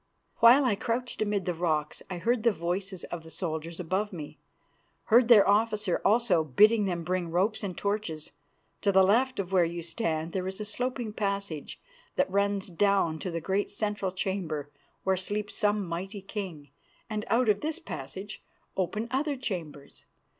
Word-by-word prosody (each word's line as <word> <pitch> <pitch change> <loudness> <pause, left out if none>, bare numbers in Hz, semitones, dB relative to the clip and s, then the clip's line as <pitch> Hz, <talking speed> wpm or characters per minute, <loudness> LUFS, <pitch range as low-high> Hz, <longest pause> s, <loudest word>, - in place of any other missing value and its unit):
While 250 +4 +7
I 245 - +3
crouched 235 +4 -2
amid 205 -3 0
the 180 - 0
rocks 155 -3 -1
I 180 - -4
heard 230 +7 +1
the 230 - +4
voices 185 +1 -3
of 175 - -4
the 160 - -13
soldiers 165 -1 -4
above 190 +5 -1
me, 155 -6 -8 0.7
heard 240 0 +7
their 225 -5 +7
officer 210 -2 +2
also 205 -6 +3
bidding 210 - +5
them 175 -3 -2
bring 180 0 -1
ropes 190 +6 +1
and 185 -4 -4
torches. 200 -7 -3 0.5
To 200 - +3
the 190 0 +6
left 250 +7 +3
of 190 -2 -3
where 185 -2 +5
you 170 0 -3
stand 165 -3 -2
there 185 0 -2
is 190 +1 -5
a 210 - -3
sloping 245 0 -3
passage 200 -8 -3 0.4
that - - +1
runs 200 0 +1
down 180 -3 +2
to 185 - -4
the 165 -1 -3
great 195 +4 0
central 205 -2 -2
chamber 175 -6 -3 0.3
where 190 - +2
sleeps 205 +3 -3
some 205 -1 +1
mighty 190 +4 -5
king, 180 - -6 0.4
and 215 -1 -3
out 240 +1 +2
of 205 -1 +3
this 315 +1 -1
passage 195 - -7 0.3
open 210 +4 -1
other 285 +2 0
chambers. 165 - -6
195 Hz, 170 wpm, -29 LUFS, 170-215 Hz, 0.7 s, While